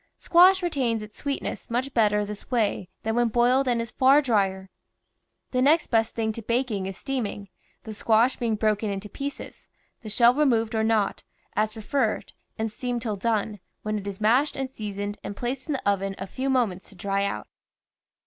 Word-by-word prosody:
Squash 365 Hz, +2 st, +5 dB
retains 250 Hz, -10 st, 0 dB
its 210 Hz, 0 st, -12 dB
sweetness 280 Hz, -1 st, -4 dB
much 255 Hz, +3 st, -1 dB
better 210 Hz, -2 st, +3 dB
this 210 Hz, 0 st, -8 dB
way 215 Hz, -6 st, 0 dB
than 220 Hz, -, -1 dB
when 240 Hz, 0 st, +3 dB
boiled 245 Hz, +4 st, +3 dB
and 240 Hz, -2 st, +2 dB
is 230 Hz, -1 st, -4 dB
far 270 Hz, +2 st, +5 dB
dryer. 195 Hz, -8 st, 0 dB, 0.8 s
The 255 Hz, -, +1 dB
next 300 Hz, +4 st, +3 dB
best 225 Hz, -1 st, +2 dB
thing 220 Hz, -1 st, 0 dB
to 230 Hz, -, -7 dB
baking 230 Hz, -4 st, -1 dB
is 190 Hz, -1 st, -6 dB
steaming, 220 Hz, -7 st, -4 dB, 0.3 s
the 220 Hz, -, -7 dB
squash 225 Hz, +4 st, +3 dB
being 230 Hz, -3 st, 0 dB
broken 215 Hz, 0 st, 0 dB
into 200 Hz, +1 st, -4 dB
pieces, 280 Hz, +5 st, -7 dB, 0.3 s
the 220 Hz, -, -8 dB
shell 235 Hz, +3 st, +5 dB
removed 240 Hz, -6 st, +2 dB
or 220 Hz, -1 st, +1 dB
not, 220 Hz, -3 st, +1 dB, 0.3 s
as 215 Hz, +1 st, +1 dB
preferred, 225 Hz, +1 st, -1 dB, 0.2 s
and 220 Hz, 0 st, -2 dB
steamed 245 Hz, +1 st, -3 dB
till 215 Hz, -4 st, -2 dB
done, 210 Hz, 0 st, -1 dB, 0.2 s
when 215 Hz, 0 st, -1 dB
it 200 Hz, -, -8 dB
is 195 Hz, -1 st, -5 dB
mashed 245 Hz, +8 st, +3 dB
and 265 Hz, -1 st, -3 dB
seasoned 205 Hz, -3 st, -5 dB
and 200 Hz, -, -6 dB
placed 250 Hz, +4 st, -3 dB
in 305 Hz, -, -1 dB
the 265 Hz, -, -3 dB
oven 195 Hz, -1 st, 0 dB
a 195 Hz, -, -5 dB
few 260 Hz, +7 st, -3 dB
mo 255 Hz, -2 st, +4 dB
ments 185 Hz, -2 st, -9 dB
to 200 Hz, -, -17 dB
dry 195 Hz, +2 st, -1 dB
out. 155 Hz, -, -3 dB
225 Hz, 190 wpm, -26 LUFS, 205-255 Hz, 0.8 s, Squash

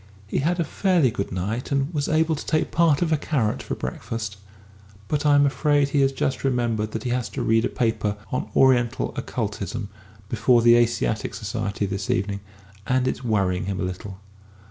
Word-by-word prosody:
He 100 Hz, -, -1 dB
had 175 Hz, +5 st, 0 dB
a -, -, +3 dB
fairly 170 Hz, -, +2 dB
good 100 Hz, -, -4 dB
night, 100 Hz, +9 st, -3 dB
and 140 Hz, +4 st, 0 dB
was 145 Hz, -2 st, -1 dB
able 160 Hz, +1 st, +2 dB
to -, -, -6 dB
take 155 Hz, -, 0 dB
part 165 Hz, -2 st, +3 dB
of 165 Hz, -, -1 dB
a 155 Hz, -, +4 dB
carrot 130 Hz, -8 st, -1 dB
for -, -, -4 dB
breakfast 110 Hz, -3 st, -5 dB, 0.7 s
but 150 Hz, +4 st, 0 dB
I'm 145 Hz, -1 st, +5 dB
afraid 145 Hz, 0 st, +2 dB
he 140 Hz, 0 st, +2 dB
has 135 Hz, 0 st, +3 dB
just 135 Hz, 0 st, -2 dB
remembered 120 Hz, -5 st, 0 dB
that 110 Hz, -, -3 dB
he 125 Hz, -, -2 dB
has 125 Hz, -1 st, -1 dB
to -, -, -4 dB
read 115 Hz, +1 st, +3 dB
a -, -, 0 dB
paper 110 Hz, -3 st, -1 dB
on 130 Hz, -, -2 dB
'Oriental 130 Hz, -2 st, +3 dB
Occultism' 105 Hz, -1 st, -4 dB, 0.4 s
before 120 Hz, +2 st, +3 dB
the 120 Hz, 0 st, +7 dB
Asiatic 120 Hz, -2 st, +1 dB
Society 100 Hz, 0 st, -3 dB
this 95 Hz, +1 st, -4 dB
evening, 100 Hz, +2 st, 0 dB, 0.5 s
and 130 Hz, 0 st, +2 dB
it's 130 Hz, -, -2 dB
worrying 95 Hz, -6 st, 0 dB
him 100 Hz, -1 st, -3 dB
a -, -, -1 dB
little.... 95 Hz, +1 st, -6 dB
120 Hz, 190 wpm, -24 LUFS, 105-140 Hz, 0.7 s, the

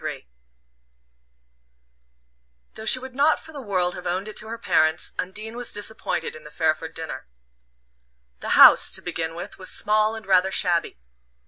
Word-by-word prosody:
III -, -, -6 dB, 2.5 s
Though 220 Hz, -, -9 dB
she 255 Hz, -, +8 dB
would 260 Hz, 0 st, -9 dB
not 290 Hz, +4 st, +2 dB
for 320 Hz, -, -14 dB
the 285 Hz, -, -7 dB
world 185 Hz, -6 st, 0 dB
have 180 Hz, -, -7 dB
owned 185 Hz, +4 st, -2 dB
it 215 Hz, -, -8 dB
to 215 Hz, -, -4 dB
her 230 Hz, +1 st, -6 dB
parents, 160 Hz, -7 st, +1 dB
Undine 215 Hz, +5 st, -4 dB
was 245 Hz, 0 st, -4 dB
disappointed 205 Hz, -5 st, -3 dB
in 155 Hz, -, -12 dB
the 150 Hz, -, -11 dB
Fairford 160 Hz, 0 st, -2 dB
dinner. 160 Hz, -, -7 dB, 1.1 s
The -, -, 0 dB
house, -, -, +8 dB
to -, -, -1 dB
begin 165 Hz, -2 st, -4 dB
with, 175 Hz, -, -8 dB
was 185 Hz, -, -3 dB
small 215 Hz, +1 st, +1 dB
and 220 Hz, -2 st, -9 dB
rather 190 Hz, 0 st, +3 dB
shabby. 175 Hz, -, 0 dB
190 Hz, 160 wpm, -23 LUFS, 170-220 Hz, 2.5 s, she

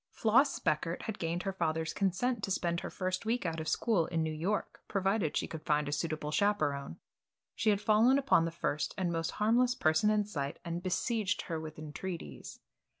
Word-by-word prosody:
Floss 265 Hz, +6 st, +3 dB
Speckert 165 Hz, +3 st, -1 dB
had 220 Hz, -, -5 dB
gained 170 Hz, +2 st, -2 dB
her 195 Hz, -, -2 dB
father's 160 Hz, -3 st, -1 dB
consent 210 Hz, +4 st, 0 dB
to -, -, -1 dB
spend 170 Hz, -3 st, 0 dB
her -, -, -5 dB
first 185 Hz, +1 st, -2 dB
week 230 Hz, -1 st, -1 dB
out 165 Hz, -1 st, -2 dB
of 160 Hz, -, -4 dB
school 200 Hz, -6 st, +2 dB
in 165 Hz, -2 st, 0 dB
New 160 Hz, 0 st, -2 dB
York 185 Hz, +7 st, -2 dB
provided 195 Hz, -4 st, 0 dB
she -, -, 0 dB
could 160 Hz, -, -7 dB
find 150 Hz, -1 st, +1 dB
a -, -, -2 dB
suitable 150 Hz, 0 st, -2 dB
chaperon. 150 Hz, -, 0 dB, 0.6 s
She 220 Hz, -, +1 dB
had 205 Hz, -1 st, +3 dB
fallen 220 Hz, +5 st, +5 dB
upon 270 Hz, -12 st, +4 dB
the -, -, -1 dB
first 155 Hz, -2 st, -2 dB
and 180 Hz, -2 st, 0 dB
most 165 Hz, -1 st, -2 dB
harmless 240 Hz, +4 st, +3 dB
person 160 Hz, +4 st, +3 dB
in 210 Hz, -1 st, +2 dB
sight 145 Hz, -9 st, -4 dB
and 170 Hz, +1 st, -3 dB
besieged 205 Hz, +2 st, 0 dB
her 165 Hz, -2 st, -3 dB
with 155 Hz, -1 st, -8 dB
entreaties. 155 Hz, -, -7 dB
175 Hz, 195 wpm, -32 LUFS, 160-210 Hz, 0.6 s, fallen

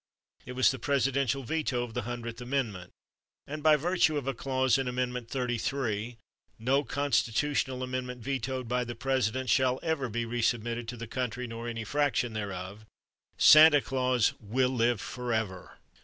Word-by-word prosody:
It 125 Hz, -, -6 dB
was 130 Hz, 0 st, +4 dB
the 130 Hz, -, -6 dB
presidential 135 Hz, 0 st, +1 dB
veto 130 Hz, -2 st, -1 dB
of 120 Hz, -2 st, -7 dB
the -, -, -2 dB
Hundredth 120 Hz, 0 st, -6 dB
Amendment; 120 Hz, -9 st, -2 dB, 0.6 s
and 150 Hz, +2 st, -6 dB
by 155 Hz, 0 st, +6 dB
virtue 165 Hz, 0 st, +2 dB
of 140 Hz, -, -3 dB
a 135 Hz, -, -1 dB
clause 130 Hz, +1 st, +1 dB
in 135 Hz, -, -1 dB
Amendment 125 Hz, -1 st, -3 dB
Thirty 125 Hz, -3 st, -2 dB
three 115 Hz, -3 st, -2 dB, 0.4 s
"no 130 Hz, +5 st, +1 dB
Constitutional 135 Hz, -1 st, 0 dB
Amendment 125 Hz, -1 st, -4 dB
vetoed 130 Hz, -1 st, -3 dB
by 125 Hz, +1 st, 0 dB
the 120 Hz, 0 st, -6 dB
President 130 Hz, 0 st, -1 dB
shall 130 Hz, -1 st, +3 dB
ever 160 Hz, -6 st, -1 dB
be 115 Hz, +2 st, -2 dB
resubmitted 120 Hz, 0 st, -1 dB
to 120 Hz, +1 st, -6 dB
the 115 Hz, -, -6 dB
country 125 Hz, +1 st, -3 dB
nor 115 Hz, 0 st, -6 dB
any 115 Hz, -1 st, -4 dB
fraction 140 Hz, -2 st, 0 dB
thereof—" 100 Hz, -1 st, -5 dB, 0.5 s
Santa 155 Hz, -1 st, +8 dB
Claus 130 Hz, -4 st, +1 dB
will 125 Hz, +5 st, +1 dB
live 120 Hz, -3 st, +1 dB
forever! 110 Hz, -6 st, -4 dB
125 Hz, 155 wpm, -29 LUFS, 115-135 Hz, 0.6 s, Santa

